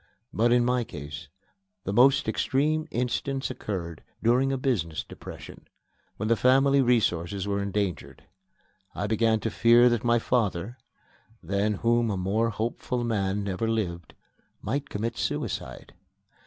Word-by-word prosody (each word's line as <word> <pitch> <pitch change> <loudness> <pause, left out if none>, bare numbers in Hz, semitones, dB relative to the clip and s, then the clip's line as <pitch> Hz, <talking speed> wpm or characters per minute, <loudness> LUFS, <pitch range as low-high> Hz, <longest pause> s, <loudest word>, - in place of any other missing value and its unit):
But 120 +2 +2
in 120 0 +4
my 125 0 +1
case 75 - -8 0.6
the 100 - -3
most 130 +3 +5
extreme 150 +7 0
instance 130 +3 -2
occurred 85 -6 -5 0.2
during 125 +4 +3
a 135 - 0
business 100 - -1
depression, - - -11 0.5
when 110 - -2
the 115 - +4
family 135 +4 +4
resources 100 -6 +1
were 100 0 -1
endangered. 100 -2 -3 0.7
I 100 - -2
began 110 +1 +2
to 115 - -2
fear 120 +2 +5
that 120 -2 0
my 120 0 +3
father 115 -1 -1 0.6
(than 100 +5 0
whom 120 0 +3
a 100 - -1
more 105 +5 0
hopeful 120 +2 -3
man 100 -3 -1
never 100 +3 -2
lived) 90 -7 -3 0.4
might 140 +1 -3
commit 110 +3 -3
suicide. 65 0 -4
115 Hz, 135 wpm, -27 LUFS, 100-125 Hz, 0.7 s, most